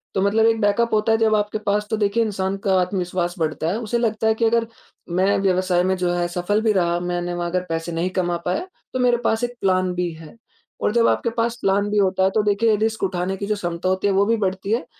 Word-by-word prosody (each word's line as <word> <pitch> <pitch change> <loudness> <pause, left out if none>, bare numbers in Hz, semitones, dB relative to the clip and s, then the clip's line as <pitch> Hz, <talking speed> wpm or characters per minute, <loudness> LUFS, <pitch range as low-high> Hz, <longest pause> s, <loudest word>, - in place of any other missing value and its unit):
तो 190 - +1
मतलब 215 +3 +3
एक 225 -1 +3
बैकअप 220 +3 +1
होता 215 +1 +2
है - - +3
जब 220 -1 +3
आपके 210 +1 -1
पास 210 +1 +1
तो 220 - 0
देखिए 215 +2 +1
इंसान 195 -2 -2
का 190 - +3
आत्मविश्वास 180 -1 -2
बढ़ता 155 0 -1
है 205 - -1
उसे 235 +2 -1
लगता 220 -1 0
है 220 - +4
कि 230 - +1
अगर 230 0 +2 0.5
मैं 200 +2 +3
व्यवसाय 185 -2 +2
में 190 0 +1
जो 180 -1 0
है 175 0 0
सफल 180 +5 -1
भी 220 -1 +2
रहा, 175 -2 +1
मैंने 175 0 -3
वहाँ 175 0 -2
अगर 180 +1 0
पैसे 165 +1 -3
नहीं 170 +3 -1
कमा 175 -1 0
पाया, 185 - -1 0.3
तो 255 - -2
मेरे 245 -1 +3
पास 225 +2 +1
एक 245 0 -1
प्लान 185 -1 +1
बी 175 -1 -1
है। 160 +4 -13 0.5
और - - +1
जब 235 -1 +4
आपके 235 - +1
पास 230 +1 0
प्लान 200 +1 +1
बी 210 - 0
होता 190 -1 +2
है, 190 - +4
तो 210 +2 +1
देखिए 210 +2 +2
ये - - +4
रिस्क 220 0 -1
उठाने 185 0 -1
की 200 - -4
जो 210 - 0
क्षमता 175 -1 -3
होती 190 +2 0
है, 195 - +2
वो 200 +1 +3
भी 230 +1 +2
बढ़ती 195 0 -2
है। 235 - 0
195 Hz, 260 wpm, -22 LUFS, 180-220 Hz, 0.5 s, है